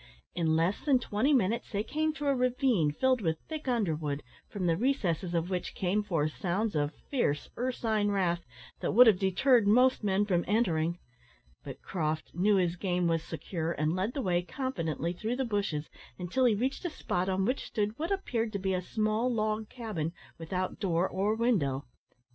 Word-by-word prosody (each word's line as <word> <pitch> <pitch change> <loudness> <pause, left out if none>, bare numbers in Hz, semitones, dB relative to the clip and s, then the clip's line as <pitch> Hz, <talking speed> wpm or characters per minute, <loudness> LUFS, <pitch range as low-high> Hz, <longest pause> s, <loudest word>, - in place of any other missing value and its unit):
In 160 -2 +1
less 170 +5 +1
than 280 -3 +4
twenty 245 +3 0
minutes, 230 -4 +1
they 205 0 -1
came 310 +6 0
to 295 -1 -5
a 280 -1 +3
ravine 250 - +2
filled 255 - +1
with 160 -4 0
thick 310 -3 -6
underwood, 160 - -1 0.3
from 195 -3 -3
the 165 -1 +3
recesses 185 - 0
of 170 +2 -1
which 180 -1 -3
came 190 +3 +1
forth 165 -7 -1
sounds 200 +2 -1
of 145 0 0 0.2
fierce 150 - 0
ursine 225 -4 0
wrath 175 -4 0 0.4
that - - -1
would 245 +4 +9
have 210 -6 +5
deterred 205 +4 +3
most 250 +3 +4
men 200 0 +2
from 175 -4 +1
entering; 170 -6 +1 0.7
but 135 -2 -9
Croft 155 -3 -2
knew 200 +5 +3
his 180 -2 +1
game 180 -1 0
was 165 -1 +1
secure, 165 0 -4
and 155 +1 0
led 195 +6 -2
the 275 - -1
way 175 -3 +2
confidently 170 - -3
through 220 +7 -3
the 265 +1 -1
bushes, 200 -9 -1 0.3
until 185 +9 0
he 230 -4 +4
reached 260 - -2
a 350 - -1
spot 185 - -2
on 190 0 +1
which 255 +5 -1
stood 210 +2 -2
what 325 - -2
appeared 235 - -1
to - - 0
be 190 0 -1
a 180 - 0
small 215 +5 0
log 215 -1 -1
cabin 210 -10 -4 0.3
without 185 +3 -3
door 180 -2 +1
or 200 +3 0
window. 175 - +1
200 Hz, 185 wpm, -30 LUFS, 170-235 Hz, 0.7 s, would